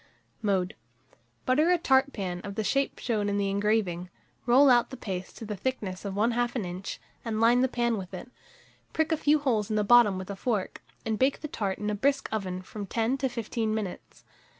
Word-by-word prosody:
Mode. 190 -4 0 0.7
Butter 300 +6 +3
a 360 - +5
tart 270 -4 +3
pan 180 -6 -4
of 200 -1 -6
the 220 - -1
shape 275 +5 0
shown 210 -4 -1
in 200 - 0
the 200 -1 0
engraving, 200 -4 0 0.4
roll 260 +4 +6
out 245 -2 +5
the 260 - -8
paste 185 -5 -5
to 225 - -7
the 210 0 -4
thickness 200 -4 -3
of 195 -1 -3
1/2 240 +3 +1
an 225 -6 -1
inch, 180 +2 -6 0.2
and 220 -2 -2
line 235 +2 +5
the 260 - +4
pan 235 -3 0
with 185 -2 -8
it; 200 +7 -8 0.6
prick 320 +1 +1
a - - +4
few 300 0 +4
holes 235 -8 0
at 215 - 0
the 210 - +2
bottom 210 -3 +6
with 185 +1 -6
a - - -5
fork, 210 -2 -2 0.2
and 220 -1 -1
bake 265 +1 +2
the 305 - -4
tart 200 -8 -2
in 210 0 -2
a - - -1
brisk 270 +6 +1
oven 185 -4 -3
from 205 +1 -7
10 230 +6 0
to 265 -1 0
15 230 -2 -2
minutes. 205 -5 -6
220 Hz, 215 wpm, -28 LUFS, 200-250 Hz, 0.7 s, roll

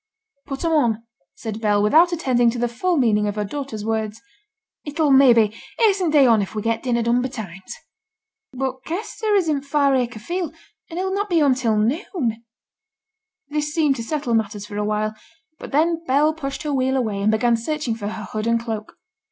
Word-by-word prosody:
'Put 275 +3 -4
'em 330 - +1
on,' 235 -8 +2 0.3
said 220 -1 -6
Bell, 210 -2 +2
without 325 +12 +5
attending 255 -8 +2
to 235 - -3
the 240 0 +1
full 325 +10 -1
meaning 210 -5 +2
of 205 - -2
her 210 - -1
daughter's 225 -3 -5
words. 220 -1 -2 0.6
'It'll, 295 0 0
maybe, 240 -6 +6 0.2
hasten 395 -5 +3
t' - - -3
day 275 - +7
on 225 -4 +5
if 195 - -5
we 210 - -2
get 230 0 0
dinner 235 -2 0
done 235 +2 +2
betimes.' 205 -8 -6 0.8
'But 260 0 -4
Kester 420 +4 -2
is 375 -4 +2
in 295 -3 0
t' 280 - -19
Far 280 -1 +3
Acre 245 -3 -1
field, 345 - -4 0.3
and 335 - -7
he'll 380 +1 -1
not 405 +1 -1
be 345 - +2
home 290 -4 +4
till 235 -4 0
noon.' 235 - -1 1.1
This 295 0 -2
seemed 300 -4 +3
to 230 - -4
settle 280 -1 -2
matters 210 -2 -1
for 205 0 -7
a 210 - 0
while; 215 +1 -1 0.5
but - - -9
then 325 +3 +1
Bell 295 +3 +3
pushed 275 -3 -5
her 300 -1 -2
wheel 265 0 +1
away, 215 -6 -1
and 205 - +2
began 235 +2 +2
searching 270 +1 -2
for 215 -2 -5
her 215 0 -5
hood 215 +3 -4
and 230 0 +2
cloak. 220 -2 -6
250 Hz, 200 wpm, -22 LUFS, 220-300 Hz, 1.1 s, day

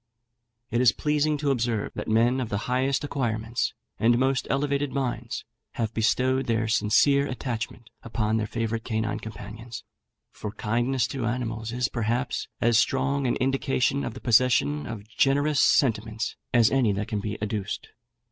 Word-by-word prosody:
It 120 +2 +2
is 125 -2 +6
pleasing 150 +1 +1
to 145 -1 0
observe 115 -4 -1
that - - -5
men 120 +4 +3
of 120 - -3
the 100 +1 -2
highest 130 +3 +1
acquirements 120 -5 -2 0.2
and 120 +1 +4
most 130 +1 +1
elevated 140 0 0
minds 120 -4 -3 0.3
have 115 -1 -2
bestowed 130 +4 +1
their 115 -1 +1
sincere 140 +6 +3
attachment 120 -2 -5
upon 110 -1 -1
their 110 -1 -1
favourite 115 0 -2
canine 110 -2 -2
companions; 110 +1 -8 0.5
for 105 -1 -6
kindness 120 +4 0
to 130 -4 -2
animals 115 -2 -3
is, 125 +1 0
perhaps, 120 +2 -1
as 115 -1 +4
strong 135 +1 +1
an 120 - +1
indication 135 +1 +1
of - - -4
the - - -9
possession 110 - +3
of 110 -2 -7
generous 140 +5 +2
sentiments 115 -6 +2 0.2
as 115 -3 +5
any 130 -6 +3
that 100 +1 -3
can 105 - -2
be 105 +1 -4
adduced. 105 -1 -3
120 Hz, 155 wpm, -26 LUFS, 110-135 Hz, 0.5 s, is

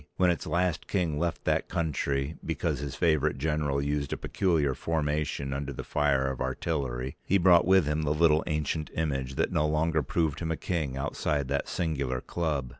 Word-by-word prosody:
When 90 -1 +4
its 85 - -3
last 85 0 0
king 85 -7 0
left 85 0 -2
that - - +1
country, 75 -3 -1
because - - -1
his 70 -1 -5
favorite 75 -4 +2
general 75 -1 0
used 70 0 -1
a - - -1
peculiar 80 -8 +1
formation 75 -2 -1
under 70 0 -3
the 65 - -6
fire 70 -2 +1
of 65 - -6
artillery, 65 -1 -2
he 100 - +3
brought 90 -2 +5
with 95 -3 +5
him 75 +1 0
the 75 - -1
little 80 0 +4
ancient 75 0 -1
image 70 -4 -2
that - - 0
no 75 - +2
longer 80 +1 +1
proved 75 +1 -1
him 80 - -3
a 80 - -1
king 75 -7 -2
outside 70 0 -1
that 70 0 -1
singular 70 -7 -1
club. 75 -4 -2
75 Hz, 185 wpm, -28 LUFS, 70-80 Hz, -, brought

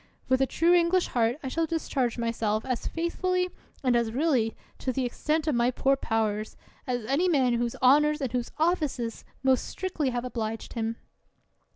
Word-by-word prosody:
With 260 0 +3
a 270 - +3
true 335 +5 +3
English 350 +1 +3
heart, 235 0 +1
I - - -3
shall 325 +5 0
discharge 270 -7 -1
myself 225 -2 -1
as 255 -2 -2
faithfully 360 +2 -1 0.3
and 250 -2 +3
as 235 -2 +1
really, 255 -4 +1 0.2
to 260 - -1
the 255 +1 -1
extent 305 +5 -1
of 305 - +1
my 240 0 +3
poor 270 +2 +2
powers, 220 -4 -1 0.3
as 245 -3 -2
any 285 +10 +2
man 260 -7 +3
whose 235 0 -1
honors 300 +4 +5
or 270 - 0
whose 245 -1 -2
offices 300 -9 0 0.2
most 265 -1 +3
strictly 360 -7 -2
have 245 0 -2
obliged 225 -3 -4
him. 225 -1 -2
255 Hz, 175 wpm, -27 LUFS, 235-310 Hz, 0.3 s, honors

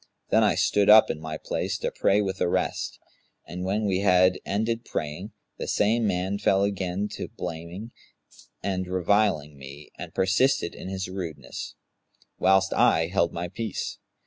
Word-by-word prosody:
Then - - +5
I - - +3
stood 100 0 +2
up 110 +1 +8
in 75 - -7
my 80 -1 -5
place - - -3
to - - -3
pray 100 +2 +2
with 95 -1 -3
the 85 - +1
rest; - - -1 0.5
and 90 +2 -6
when 100 +3 0
we 95 -2 +1
had 90 -2 +4
ended 115 +3 -1
praying, 80 +5 -5 0.3
the - - -4
same 110 +2 +2
man 95 +1 -1
fell 100 -1 +3
again 100 0 -1
to - - -6
blaming 85 +5 -6
me 115 - -11 0.7
and 95 -1 -2
reviling 90 -5 +1
me 70 +2 -11
and - - -7
persisted 95 +1 +2
in - - -8
his 95 0 -3
rudeness, 85 -9 -6 0.6
whilst 95 +1 +3
I 80 0 +3
held 85 -3 +2
my 85 +1 -4
peace. 110 +5 -5
95 Hz, 165 wpm, -26 LUFS, 85-100 Hz, 0.7 s, up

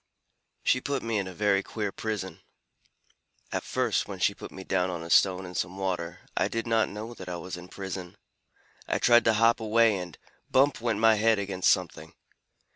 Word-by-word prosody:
"She 125 - +2
put 140 -1 -2
me 115 -2 0
in 95 - -3
a - - -6
very 100 -1 +2
queer 105 -1 -4
prison. 100 -6 -5 1.1
At - - -1
first, - - 0
when - - -6
she - - +2
put - - -10
me 95 - -9
down 95 -1 0
on 85 -2 -4
a 85 - -7
stone 95 -1 +4
in 90 - -8
some 90 +1 -3
water, 90 -2 -3
I - - +2
did 115 0 -3
not 115 -1 +2
know 110 +3 -7
that 95 -5 -9
I 90 - -3
was 90 +1 -6
in 90 0 -10
prison. 95 -2 -7 0.7
I - - +1
tried 120 -1 +5
to 115 - +4
hop 115 +2 +4
away, 110 0 +3
and 90 -3 -8 0.3
bump! 135 -1 +3
went 115 -3 0
my 110 +1 +5
head 110 +1 +3
against 95 -2 0
something. 85 -4 -1
100 Hz, 200 wpm, -28 LUFS, 90-115 Hz, 1.1 s, tried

